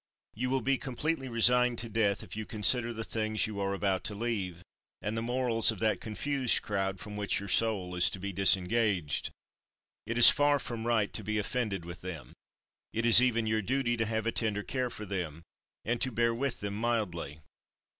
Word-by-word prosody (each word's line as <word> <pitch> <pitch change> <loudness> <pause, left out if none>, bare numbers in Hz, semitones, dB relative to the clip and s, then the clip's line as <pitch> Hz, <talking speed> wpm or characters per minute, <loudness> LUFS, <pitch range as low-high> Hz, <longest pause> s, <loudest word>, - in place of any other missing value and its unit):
You 125 +3 -3
will 135 0 0
be 135 -1 +1
completely 135 +1 -3
resigned 125 +1 +3
to 115 - -3
death 105 -2 0
if - - -9
you 110 0 -6
consider 120 +2 +3
the 115 -1 -5
things 110 -1 -1
you 105 -2 -6
are 100 0 -1
about 95 -1 -1
to 105 - -4
leave, 100 -6 -3 0.4
and 105 +2 -4
the 115 - -2
morals 120 -1 +2
of 110 - -1
that 110 +1 0
confused 130 +3 0
crowd 95 -2 -2
from 105 +1 -8
which 100 -1 -1
your 100 - -7
soul 100 -2 +1
is 90 0 +2
to 95 - -7
be 100 +1 -5
disengaged. 95 - +1 0.8
It 115 +1 -2
is 120 - +11
far 145 0 +2
from 120 -4 -5
right 110 -4 +1
to - - -6
be 110 0 -2
offended 105 -4 -2
with 85 +1 -9
them. 90 -5 -8 0.6
It 115 +1 -2
is 120 +1 +9
even 115 -3 +1
your 110 0 0
duty 120 +2 0
to 110 -2 -1
have 110 0 -2
a 115 - +1
tender 105 -2 -2
care 125 +1 -2
for 110 -3 -8
them, 85 -5 -5 0.4
and 120 +1 -1
to 130 - -1
bear 115 0 +1
with 135 +2 -3
them 100 0 -4
mildly. 100 -9 -3
110 Hz, 200 wpm, -30 LUFS, 100-120 Hz, 0.8 s, is